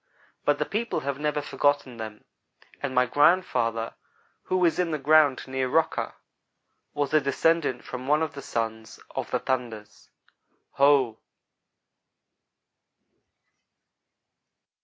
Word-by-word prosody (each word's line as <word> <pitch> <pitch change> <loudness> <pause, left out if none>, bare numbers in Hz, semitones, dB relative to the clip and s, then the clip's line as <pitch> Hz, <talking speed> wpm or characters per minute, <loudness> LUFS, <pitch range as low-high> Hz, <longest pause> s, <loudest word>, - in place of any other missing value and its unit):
But - - +3
the - - -1
people 230 +2 -2
have 140 0 -3
never 150 -1 -1
forgotten 145 -4 0
them, 110 -1 -8 0.6
and 135 -2 -3
my 125 0 +4
grandfather, 120 -6 +2 0.5
who 185 -1 +1
is 165 0 +1
in 180 -2 +1
the 155 - -1
ground 150 -1 +4
near 130 -1 -2
Rocker, 160 +4 0 0.8
was 145 0 -1
a 155 - +5
descendant 140 -1 +1
from 130 0 -7
one 150 +2 +3
of 155 - -3
the 140 - -8
sons 110 -3 -4 0.2
of - - -3
the - - +1
'thunders.' 120 -5 -4 0.6
Ho!" 135 -5 +3
140 Hz, 115 wpm, -26 LUFS, 125-155 Hz, 0.8 s, a